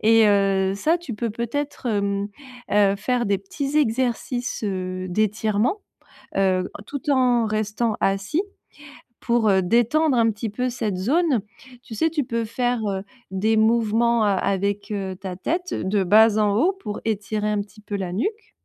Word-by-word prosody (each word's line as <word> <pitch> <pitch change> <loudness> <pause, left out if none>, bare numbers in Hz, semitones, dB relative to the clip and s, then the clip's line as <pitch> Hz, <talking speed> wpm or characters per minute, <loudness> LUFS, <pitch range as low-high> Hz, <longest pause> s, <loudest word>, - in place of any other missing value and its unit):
et 225 0 +5
heu, 195 -1 +2
ça, 320 +11 +2
tu 345 -8 -7
peux 230 +1 -2
peut-être, 255 +5 -4
hem, 200 -2 0 0.4
heu, 200 -1 +4
faire 245 +2 0
des 200 -1 +1
petits 275 +9 -4
exercices, 245 -2 0
heu, 185 -2 -3
d'étirement, 215 - 0 0.6
heu, 185 -1 +2 0.2
tout 285 +1 -6
en 250 -3 +3
restant 215 +1 -1
assis 195 - 0 0.8
pour, 235 -2 +2
heu, 190 -1 +4
détendre 240 - +2
un 225 -1 +3
petit 215 +1 -4
peu 250 +5 -2
cette 220 -5 -2
zone. 270 - +2 0.4
Tu 225 - -9
sais, 320 +9 +1
tu 300 -4 -1
peux 230 -1 -2
faire, 245 +1 -1
heu, 195 0 -3 0.3
des 215 +4 +1
mouvements 225 +1 +3
a 205 - +3
avec 200 +2 -1
heu, 195 -2 -3
ta 185 -1 -7
tête 350 - -2
de 195 +1 0
bas 215 +3 +5
en 205 -1 +2
haut 345 - +3
pour 215 - -7
étirer 210 0 -1
un 210 -1 0
petit 210 +1 -10
peu 205 - -6
la 185 -3 -3
nuque 420 - -3
215 Hz, 165 wpm, -23 LUFS, 200-245 Hz, 0.8 s, et